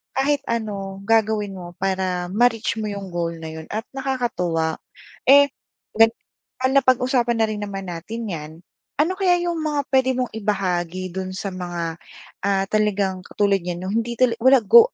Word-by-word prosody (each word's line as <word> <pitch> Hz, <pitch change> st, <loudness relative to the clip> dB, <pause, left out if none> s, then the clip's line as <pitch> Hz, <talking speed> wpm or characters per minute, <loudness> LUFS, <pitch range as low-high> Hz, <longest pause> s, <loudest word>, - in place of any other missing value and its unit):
kahit 280 Hz, +2 st, +2 dB
ano 200 Hz, -4 st, -3 dB
gagawin 210 Hz, -2 st, +1 dB
mo 175 Hz, -1 st, -9 dB
para 185 Hz, -2 st, -1 dB
ma-reach 225 Hz, 0 st, +2 dB
mo 215 Hz, -, -2 dB
'yong 200 Hz, -2 st, -5 dB
goal 170 Hz, -1 st, -2 dB
na 160 Hz, -, -5 dB
'yon 160 Hz, -, -10 dB
at 220 Hz, +1 st, -3 dB
nakakatuwa. 205 Hz, -12 st, -1 dB, 0.5 s
Eh, 280 Hz, +1 st, +7 dB, 0.5 s
gan 225 Hz, 0 st, +7 dB, 0.6 s
napag-usapan 255 Hz, -3 st, +3 dB
na -, -, +5 dB
rin 215 Hz, -1 st, -4 dB
naman 195 Hz, -2 st, -5 dB
natin 215 Hz, +8 st, -6 dB
'yan, 155 Hz, -2 st, -5 dB, 0.5 s
ano 320 Hz, +5 st, +3 dB
kaya 370 Hz, -2 st, +4 dB
'yong 345 Hz, -1 st, -1 dB
mga 300 Hz, -2 st, 0 dB
puwede 260 Hz, -1 st, +3 dB
mong 250 Hz, -1 st, -1 dB
ibahagi 185 Hz, -3 st, -1 dB
do'n 185 Hz, +1 st, -4 dB
sa 195 Hz, +1 st, -4 dB
mga, 175 Hz, -3 st, -4 dB, 0.5 s
ah, 195 Hz, -1 st, +2 dB
talagang 205 Hz, -3 st, +1 dB
katulad 200 Hz, -1 st, +2 dB
niyan 175 Hz, 0 st, -5 dB
'no 185 Hz, -, -3 dB
hindi 230 Hz, +2 st, -1 dB
talaga 235 Hz, -1 st, +2 dB
walang 260 Hz, -3 st, +6 dB
go 470 Hz, +1 st, +8 dB
210 Hz, 160 wpm, -22 LUFS, 185-250 Hz, 0.6 s, go